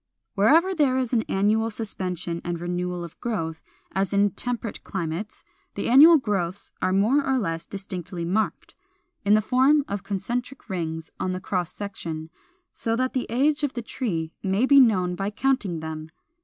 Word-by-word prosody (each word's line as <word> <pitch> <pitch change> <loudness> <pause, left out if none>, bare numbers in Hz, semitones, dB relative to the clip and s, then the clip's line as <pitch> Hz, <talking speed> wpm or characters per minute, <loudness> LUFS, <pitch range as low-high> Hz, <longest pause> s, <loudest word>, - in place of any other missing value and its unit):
Wherever 315 - +4
there 280 -7 +2
is 255 -2 -1
an 230 - +4
annual 215 +3 +2
suspension 180 -6 -4
and 175 -1 -3
renewal 175 0 -3
of 170 - -11
growth, 165 -9 -3 0.3
as 195 +1 -1
in 200 0 +4
temperate 240 +1 -4
climates, 175 +2 -4 0.3
the - - -2
annual 305 +7 +9
growths 200 - -2
are 185 - +1
more 220 +10 +3
or 265 -1 +1
less 165 -8 -2
distinctly 180 -3 -5
marked, 210 +6 -1 0.5
in 205 +1 +6
the 215 - +4
form 270 +5 +4
of 200 -1 -3
concentric 240 +7 -4
rings 160 -3 -4
on 185 - -1
the 185 - -3
cross 180 -2 -2
section, 165 -6 -6 0.4
so 225 0 -1
that 255 +2 0
the 255 - -1
age 285 +6 +2
of 285 - 0
the 240 - -4
tree 170 -10 -3
may 195 +5 +1
be 280 +1 +7
known 190 -8 +4
by 195 +3 -2
counting 210 -7 0
them. 160 0 -6
200 Hz, 170 wpm, -25 LUFS, 175-245 Hz, 0.5 s, annual